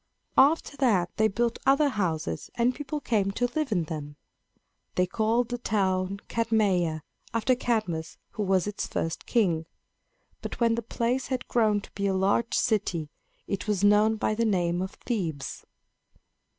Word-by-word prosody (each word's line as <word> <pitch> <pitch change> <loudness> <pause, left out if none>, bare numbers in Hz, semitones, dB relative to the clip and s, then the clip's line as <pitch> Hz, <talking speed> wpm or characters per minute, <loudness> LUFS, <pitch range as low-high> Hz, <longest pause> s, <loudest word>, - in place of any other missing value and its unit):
After 285 +1 +4
that 200 -10 +2
they 220 0 +4
built 235 +3 -1
other 280 +2 +4
houses, 180 - -2
and 240 +1 +2
people 290 +2 -4
came 210 -8 +1
to 245 - 0
live 305 -5 0
in 180 -5 +2
them. 150 -3 -6 0.8
They 180 - +3
called 225 +5 +1
the 245 0 -3
town 195 -3 0
Cadmeia, 195 -9 +1 0.3
after 230 +3 +3
Cadmus 215 -10 -1
who 215 - -5
was 190 -2 +2
its 210 0 -3
first 165 +1 -3
king. 170 -9 +1 0.7
But - - -6
when 230 -1 +3
the 235 - -1
place 240 +3 -1
had 260 -1 -3
grown 215 -3 +2
to - - -14
be 200 0 -2
a 190 - +1
large 200 +5 +1
city, 180 -9 0 0.3
it 200 +1 -3
was 205 -2 0
known 210 +2 +5
by 215 - 0
the 230 +2 0
name 175 -5 +1
of 190 +1 -4
Thebes. 170 - -3
210 Hz, 160 wpm, -27 LUFS, 185-235 Hz, 0.8 s, known